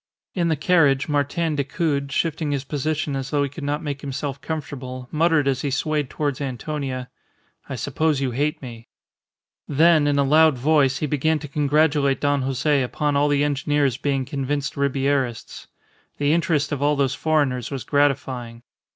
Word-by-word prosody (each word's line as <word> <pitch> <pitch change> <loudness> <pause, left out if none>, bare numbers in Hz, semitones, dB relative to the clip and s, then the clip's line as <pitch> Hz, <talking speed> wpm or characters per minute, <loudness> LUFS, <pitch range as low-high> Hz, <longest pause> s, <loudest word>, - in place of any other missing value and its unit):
In 175 -3 0
the 160 - +2
carriage 145 -4 +3
Martin 150 +2 0
Decoud, 140 0 -1
shifting 160 0 -1
his 140 -2 -1
position 145 +1 -2
as 135 0 -4
though 145 0 +1
he 140 - -2
could 145 +2 -9
not 145 +3 -2
make 140 -2 -4
himself 140 0 -4
comfortable, 130 -5 -6
muttered 160 -2 +2
as 135 -1 0
he 145 - -1
swayed 145 0 -1
towards 145 -2 -2
Antonia, 130 -1 -4 0.6
"I 135 - -3
suppose 145 +4 0
you 135 -2 -1
hate 145 +4 -1
me." 115 -2 -9 0.8
Then 155 +1 +4
in 145 -1 +2
a 140 - +4
loud 155 0 +4
voice 140 0 +3
he 150 - -2
began 150 +2 +1
to 150 - -7
congratulate 145 -1 +2
Don 145 -1 +1
Jose 135 +2 +1
upon 145 +3 -1
all 145 +1 +3
the 145 0 +2
engineers 145 -2 +1
being 135 -2 -1
convinced 140 +1 -2
Ribierists. 135 -3 -1 0.5
The 145 +1 +2
interest 160 -3 +1
of 145 -2 -2
all 145 +1 +3
those 140 -2 +1
foreigners 140 -6 0
was 135 -5 -5
gratifying. 130 -4 -1
145 Hz, 170 wpm, -23 LUFS, 135-150 Hz, 0.8 s, Then